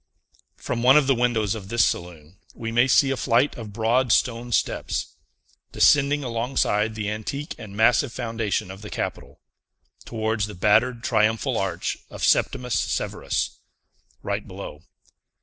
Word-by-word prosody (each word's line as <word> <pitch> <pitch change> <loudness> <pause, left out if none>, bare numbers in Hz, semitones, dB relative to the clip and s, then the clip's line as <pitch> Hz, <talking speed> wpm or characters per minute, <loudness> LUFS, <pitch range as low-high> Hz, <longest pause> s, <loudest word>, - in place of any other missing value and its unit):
From 120 - -3
one 130 +4 +6
of 150 - +4
the 135 - +3
windows 115 -5 +1
of 100 -4 -8
this 115 +1 +3
saloon, 85 0 -5 0.2
we 115 -1 -5
may 120 +3 +3
see 135 +1 +4
a - - 0
flight 125 +3 +1
of 110 -3 -8
broad 115 +4 +1
stone 120 0 +1
steps, - - -1 0.6
descending 145 0 +4
alongside 115 -3 0
the 110 -2 -3
antique 110 +8 -4
and 100 -1 -9
massive 120 +3 +3
foundation 115 -6 -2
of 95 +1 -11
the 105 - -8
Capitol, - - -5 0.6
towards 110 -2 -2
the 105 - -9
battered 115 +6 +2
triumphal 110 -1 +1
arch - - -2
of - - -8
Septimius 125 -3 +1
Severus, - - -2 0.6
right - - -3
below. 75 - -9
115 Hz, 145 wpm, -24 LUFS, 105-125 Hz, 0.6 s, one